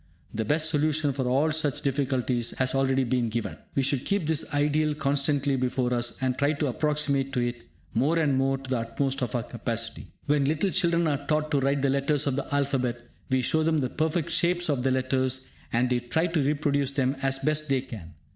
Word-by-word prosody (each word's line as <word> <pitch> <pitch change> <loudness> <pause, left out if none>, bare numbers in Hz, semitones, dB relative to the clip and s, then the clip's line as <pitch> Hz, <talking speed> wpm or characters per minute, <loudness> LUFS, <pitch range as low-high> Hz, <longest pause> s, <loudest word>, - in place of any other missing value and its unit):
The 110 0 -2
best 155 +4 +2
solution 150 -1 +1
for 130 -1 -2
all 140 +5 +2
such 155 -3 0
difficulties 130 -4 -1
has 130 -1 +1
already 135 0 +2
been 120 -1 0
given. 115 +1 -4 0.2
We 135 - +2
should 135 -1 0
keep 200 -4 0
this 160 +1 0
ideal 150 +1 +1
constantly 140 -1 +1
before 125 -1 0
us, 120 0 -1
and 130 -1 +1
try 145 +3 +1
to 150 0 -1
approximate 140 0 0
to 125 - 0
it 120 -1 -3 0.3
more 140 +9 +2
and 150 -4 +2
more 135 +1 +1
to 135 0 -10
the 130 -2 0
utmost 135 +4 -2
of 125 +1 -2
our 120 - 0
capacity. 115 -1 -4 0.2
When 145 -1 +2
little 160 +7 +1
children 170 -2 +2
are 145 -2 -1
taught 155 0 0
to 145 - +3
write 140 +1 +1
the 135 - +3
letters 140 +1 +1
of 140 -2 0
the 140 - -4
alphabet, 135 -4 0 0.3
we 130 -1 +2
show 160 - +2
them 160 0 +2
the 130 -3 -1
perfect 160 +1 -1
shapes 175 0 +1
of 135 -3 0
the 130 - +1
letters, 130 0 0 0.2
and 120 +2 +2
they 125 -1 +1
try 125 +8 0
to 165 -4 0
reproduce 140 -1 +1
them 135 -1 +1
as 135 0 +1
best 155 +2 -1
they 135 -2 +2
can. 95 - -10
140 Hz, 210 wpm, -27 LUFS, 130-150 Hz, 0.3 s, to